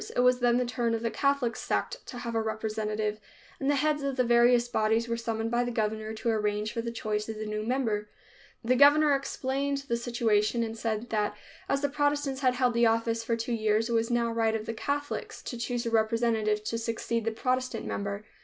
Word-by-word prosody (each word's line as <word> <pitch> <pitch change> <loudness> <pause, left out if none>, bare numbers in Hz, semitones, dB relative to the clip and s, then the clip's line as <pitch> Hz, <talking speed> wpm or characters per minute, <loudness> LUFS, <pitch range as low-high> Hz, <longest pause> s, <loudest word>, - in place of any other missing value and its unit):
It - - +3
was 250 0 +4
then 240 -1 +3
the 250 - +1
turn 235 -1 0
of 225 - -4
the 230 - 0
Catholic 275 -5 +1
sect - - -2
to 245 - -7
have 235 -1 -4
a 225 - +1
representative, 215 -1 -2 0.4
and 275 - 0
the 290 - +3
heads 295 +1 +1
of 275 -1 -2
the 255 - +2
various 240 0 +4
bodies 225 0 +1
were 235 - -1
summoned 225 -1 -2
by 240 0 +2
the 245 - -2
governor 220 -1 -2
to 230 - -2
arrange 210 -1 0
for 230 - -2
the 235 - -4
choice 215 -2 -3
of 220 - -4
the 215 - -4
new 215 0 -3
member. 220 -3 -1 0.6
The 250 +2 +3
governor 290 +2 +6
explained 275 0 -1
the 235 - 0
situation 235 -1 +1
and 225 0 -4
said 225 0 -3
that 210 -1 0 0.3
as 275 0 +1
the 285 - +2
Protestants 290 -2 0
had 255 -2 +3
held 250 -1 +2
the 235 0 +4
office 230 0 +1
for 230 0 0
two 230 +1 -2
years, 220 0 +1
it - - -1
was 230 +1 +1
now 240 -1 +1
the - - -3
right 225 -1 +1
of 215 -1 -3
the 225 - -3
Catholics 285 +5 -3
to 245 - -5
choose 240 +1 -2
a 230 - -1
representative 220 -1 +1
to 230 +2 -2
succeed 230 0 -2
the 225 - +1
Protestant 255 +1 -1
member. 200 +1 -3
230 Hz, 225 wpm, -29 LUFS, 220-250 Hz, 0.6 s, governor